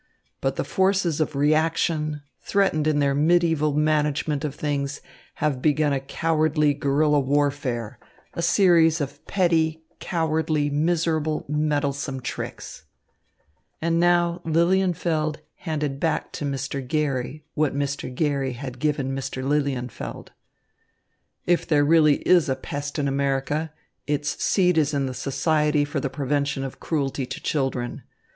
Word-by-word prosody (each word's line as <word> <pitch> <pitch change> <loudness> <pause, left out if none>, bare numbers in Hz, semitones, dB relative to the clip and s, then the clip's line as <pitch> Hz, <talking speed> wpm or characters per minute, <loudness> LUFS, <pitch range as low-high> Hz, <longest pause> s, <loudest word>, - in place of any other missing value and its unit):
But 135 0 0
the - - -1
forces 190 -5 +1
of 155 - -1
reaction, 155 0 +1 0.2
threatened 190 -7 +1
in 155 -1 +2
their 140 -1 +2
mediæval 155 -1 +2
management 150 -1 +1
of 145 -2 -3
things, 140 -2 -2 0.4
have 145 -4 -1
begun 150 0 +2
a 135 - +1
cowardly 155 +1 +1
guerilla 145 +2 +2
warfare, 140 -5 -1 0.3
a - - -3
series 170 -2 +4
of 145 0 -5
petty, 160 -4 +1 0.2
cowardly, 160 -3 0
miserable, 160 0 0
meddlesome 145 -2 -1
tricks." 125 - -6 0.9
And 165 +1 +1
now 175 0 +2
Lilienfeld 170 -2 +1 0.2
handed 150 -4 -3
back 160 0 -1
to 145 - -5
Mr. 135 0 -3
Garry 140 +1 -2
what 150 -2 0
Mr. 140 -2 -2
Garry 135 -1 -1
had 125 0 -7
given 145 -2 -1
Mr. 135 0 -4
Lilienfeld. 140 -5 -2 1.2
"If 175 -1 +1
there 145 -2 +3
really 155 -1 +4
is 175 -5 +5
a 130 - +1
pest 145 +2 -5
in 145 -2 0
America, 140 +3 -1 0.4
its 145 0 -1
seat 180 -4 +3
is 150 -1 +1
in 140 -1 +1
the 130 - -4
Society 150 +2 +1
for 145 - -3
the 135 - -2
Prevention 140 0 -1
of 135 - -7
Cruelty 140 -4 -2
to 135 - -6
Children. 135 -4 -2
150 Hz, 130 wpm, -24 LUFS, 140-160 Hz, 1.2 s, is